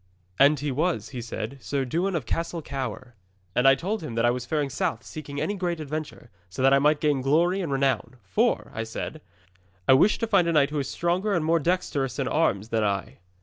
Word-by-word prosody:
And 145 +1 +6
he 145 0 -2
was, 140 - -1
he 125 -3 -6
said, 115 +3 -5
Sir 140 -2 -2
Dewin 175 +8 -1
of 150 -8 -2
Castle 165 +5 -3
Cower. 130 -3 -5 0.4
And 125 +5 +3
I 135 - +7
told 205 +9 -3
him 120 -8 -6
that 115 +1 +2
I 120 - +4
was 120 0 -4
faring 145 -2 -1
south 115 -2 -2
seeking 145 -2 -7
any 205 - -1
great 175 -4 -2
adventure, 155 -5 -6 0.2
so 100 +8 -4
that 135 +1 +6
I 140 - +6
might 150 +1 +3
gain 145 -3 +1
glory 170 +8 +2
and 165 -6 -3
renown. 135 -1 0
"For," 95 -1 0
I 110 - -3
said, 115 +7 -6 0.7
"I - - +7
wish 175 +11 +5
to 230 - -1
find 195 -6 +3
a 170 - +1
knight 145 -2 +3
who 150 - -1
is 140 - -3
stronger 185 +4 0
and 165 -3 0
more 165 +1 +3
dexterous 145 -6 -1
in 135 -2 -1
arms 115 -9 +1
than 115 -1 +1
I." 100 -2 -2
145 Hz, 225 wpm, -26 LUFS, 125-165 Hz, 0.7 s, I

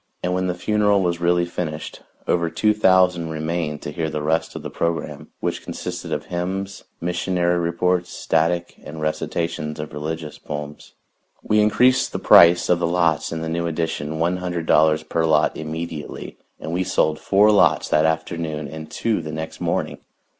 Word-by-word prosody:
And 90 - 0
when 95 0 0
the 90 - -1
funeral 105 +1 +2
was 85 -1 0
really 85 0 +2
finished, 80 -3 -5 0.3
over 85 -1 +1
two 105 +6 +2
thousand 90 -5 +3
remained 80 -1 -3
to 75 - -5
hear 80 +1 -2
the 75 -1 -4
rest 80 +2 0
of - - -6
the - - -6
program, 80 -3 -3
which - - -2
consisted - - -6
of - - -2
hymns, 95 +3 -4
missionary 90 0 0
reports, 90 +1 0
static 85 +2 0
and 80 - -8
recitations 75 0 -3
of 75 - -6
religious 75 +1 -5
poems. 75 0 -7 0.5
We 105 0 +3
increased 125 +5 +3
the - - -1
price 85 +1 +6
of 90 - +3
the 85 - +1
lots 85 -3 +1
in 80 -1 -3
the 80 - -3
new 85 +1 -1
addition 80 -2 -3
one 85 +3 +1
hundred 90 -2 -3
dollars 80 0 +4
per 80 - -1
lot 80 -2 +3
immediately, 80 -1 -6 0.2
and 80 - -5
we 90 +2 +1
sold 80 -4 +1
four 105 +2 +4
lots 105 - +4
that 75 - +3
afternoon 80 -1 -2
and 80 +1 -8
two 110 -6 -1
the 80 -1 -6
next 80 +1 -6
morning. - - -2
85 Hz, 175 wpm, -22 LUFS, 80-90 Hz, 0.5 s, price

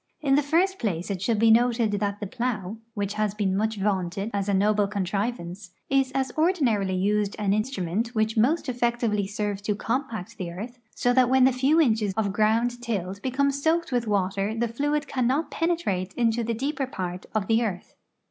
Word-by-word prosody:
In 275 -3 +1
the 285 - +5
first 350 +7 +1
place 185 -4 -2
it 185 -2 -3
should 225 +2 +1
be 225 +1 +5
noted 230 -1 +3
that 205 0 -1
the 210 - -4
plow, 220 -3 -3 0.2
which 205 -1 -2
has 210 -1 -1
been 195 -3 0
much 220 +2 0
vaunted 195 +1 -1
as 200 0 -1
a - - +2
noble 205 +1 +3
contrivance, 195 -2 -3 0.2
is 270 -1 +2
as 265 -2 0
ordinarily 255 - +2
used 205 +2 +1
an 200 -2 +1
instrument 215 0 -2
which 220 0 +1
most 270 +10 +2
effectivel}" 235 -4 0
serves 205 -1 -3
to 210 0 -1
compact 230 -2 -3
the 180 -2 -3
earth, 230 +8 -8 0.2
so 245 - +2
that 250 -1 +4
when 260 0 +5
the 260 0 +5
few 270 +6 +3
inches 220 - +2
of 205 -3 0
ground 230 +3 +1
tilled 200 -5 -3
become 275 +3 +1
soaked 320 +4 0
with 240 -2 0
water 195 +1 0
the 235 +1 +1
fluid 290 +5 -1
cannot 260 +4 0
penetrate 325 - -1
into 235 -1 +1
the 230 0 -1
deeper 275 +3 -2
part 180 -6 -5
of 215 -3 +1
the 225 +3 +2
earth. 190 -5 -4
220 Hz, 190 wpm, -26 LUFS, 200-255 Hz, 0.2 s, the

